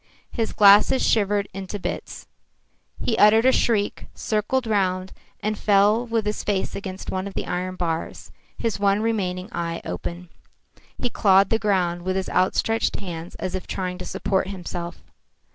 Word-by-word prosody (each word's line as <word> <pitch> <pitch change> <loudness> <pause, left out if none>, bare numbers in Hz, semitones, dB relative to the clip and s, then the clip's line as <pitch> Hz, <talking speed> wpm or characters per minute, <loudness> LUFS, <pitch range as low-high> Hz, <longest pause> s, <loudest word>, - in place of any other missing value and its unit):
His 225 -3 -2
glasses 205 +5 +6
shivered 205 -2 +2
into 195 +1 -5
bits. 180 -2 -6 0.7
He 230 - 0
uttered 220 +3 +6
a 260 - +7
shriek, 215 -5 0
circled 230 +4 -1
round, 190 -3 0 0.3
and 215 0 -2
fell 210 +4 +3
with 225 -2 0
his 210 0 -2
face 200 -2 -1
against 190 -1 -6
one 185 +1 -2
of 195 - -9
the - - -2
iron 185 +1 -3
bars, 165 -3 -4 0.3
his 225 -4 -2
one 200 +1 +2
remaining 190 -5 -1
eye 170 -1 -3
wide - - -4
open. 170 - -6 0.7
He 245 - -2
clawed 195 -3 +4
the 225 - +3
ground 180 -5 0
with 185 +1 -2
his 190 -1 -2
outstretched 225 +4 +1
hands 175 -4 -7
as 185 - -4
if 185 -1 -5
trying 180 -1 -3
to - - -6
support 190 -1 -1
himself. 175 -2 -6
195 Hz, 160 wpm, -23 LUFS, 185-210 Hz, 0.7 s, a